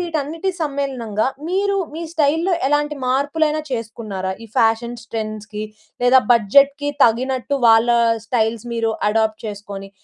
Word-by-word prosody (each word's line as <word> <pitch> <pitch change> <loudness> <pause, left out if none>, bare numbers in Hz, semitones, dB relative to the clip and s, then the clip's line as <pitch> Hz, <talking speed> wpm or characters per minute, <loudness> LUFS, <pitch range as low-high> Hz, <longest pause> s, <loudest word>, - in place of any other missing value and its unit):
వీటన్నిటి 330 +1 -2
సమ్మేళనంగా, 270 -8 -2 0.2
మీరు 395 +2 +1 0.2
మీ 330 - -5
స్టైల్‌లో 320 +4 +1 0.2
ఎలాంటి 295 +1 0
మార్పులైనా 300 +4 +1
చేసుకున్నారా? 215 -5 -4
ఈ - - -10
ఫ్యాషన్స్ 230 +1 +1
ట్రెండ్స్‌కి 215 -1 -5 0.4
లేదా 255 +1 +6
బడ్జెట్‌కి 280 +6 +3
తగినట్టు 255 +4 0
వాళ్ళ 225 +1 +5 0.4
స్టైల్స్ 230 -1 -1
మీరు 225 -1 0 0.2
అడాప్ట్ 220 0 0
చేసుకొని, 200 -1 -7
240 Hz, 115 wpm, -20 LUFS, 220-290 Hz, 0.4 s, లేదా